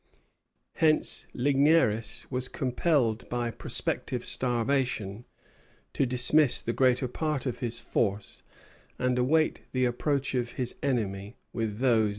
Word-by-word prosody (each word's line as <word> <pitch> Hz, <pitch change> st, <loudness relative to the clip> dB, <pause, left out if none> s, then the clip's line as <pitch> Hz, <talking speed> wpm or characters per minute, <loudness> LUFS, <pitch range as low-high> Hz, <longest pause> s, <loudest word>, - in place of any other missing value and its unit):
Hence 155 Hz, -1 st, +3 dB
Ligneris 135 Hz, -5 st, +2 dB
was 125 Hz, 0 st, -1 dB
compelled 125 Hz, -3 st, 0 dB
by 120 Hz, -1 st, -2 dB
prospective -, -, -2 dB
starvation 120 Hz, -3 st, -1 dB, 0.7 s
to 135 Hz, -, +1 dB
dismiss 130 Hz, +3 st, +3 dB
the 115 Hz, -, -2 dB
greater 130 Hz, 0 st, +2 dB
part 150 Hz, +1 st, -2 dB
of 125 Hz, -, -3 dB
his 120 Hz, -2 st, -1 dB
force, 105 Hz, -3 st, -2 dB, 0.6 s
and 125 Hz, 0 st, 0 dB
await 155 Hz, +5 st, +2 dB
the 130 Hz, 0 st, +2 dB
approach 135 Hz, +3 st, -1 dB
of 120 Hz, -2 st, -2 dB
his 125 Hz, -2 st, -1 dB
enemy 105 Hz, -6 st, -2 dB, 0.2 s
with 110 Hz, -3 st, -3 dB
those -, -, -9 dB
that 115 Hz, -, +4 dB
remained. 110 Hz, -1 st, +2 dB
125 Hz, 130 wpm, -28 LUFS, 115-135 Hz, 0.7 s, that